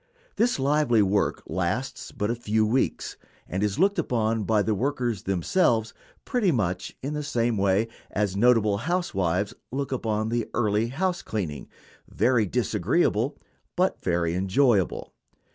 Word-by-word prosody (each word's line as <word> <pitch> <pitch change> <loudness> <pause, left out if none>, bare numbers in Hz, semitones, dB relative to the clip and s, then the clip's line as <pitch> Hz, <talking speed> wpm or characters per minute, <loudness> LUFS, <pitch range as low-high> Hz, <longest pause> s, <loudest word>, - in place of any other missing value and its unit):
This 240 +2 +2
lively 135 -5 +3
work 100 +1 0
lasts 95 +8 -3
but 105 +2 -2
a - - -1
few 110 -2 +1
weeks, 120 +5 -1 0.3
and 95 - -3
is 105 +2 0
looked 195 +3 +3
upon 115 -7 0
by 105 -1 +2
the 110 - +1
workers 120 -2 -1
themselves 110 - +1 0.3
pretty 235 -8 +1
much 95 - -2
in 140 +3 -3
the 150 - -2
same 120 -5 0
way 100 +2 +2 0.2
as 100 -2 -1
notable 110 -2 +3
housewives 105 - -1 0.2
look 140 +1 -3
upon 110 -4 -1
the 120 0 -1
early 110 -1 +1
house 175 +8 -1
cleaning 85 -10 -4 0.4
very 120 -4 +2
disagreeable, 115 - 0 0.4
but 185 +1 +1
very 85 -2 0
enjoyable. 95 +2 +1
115 Hz, 140 wpm, -26 LUFS, 100-135 Hz, 0.4 s, lively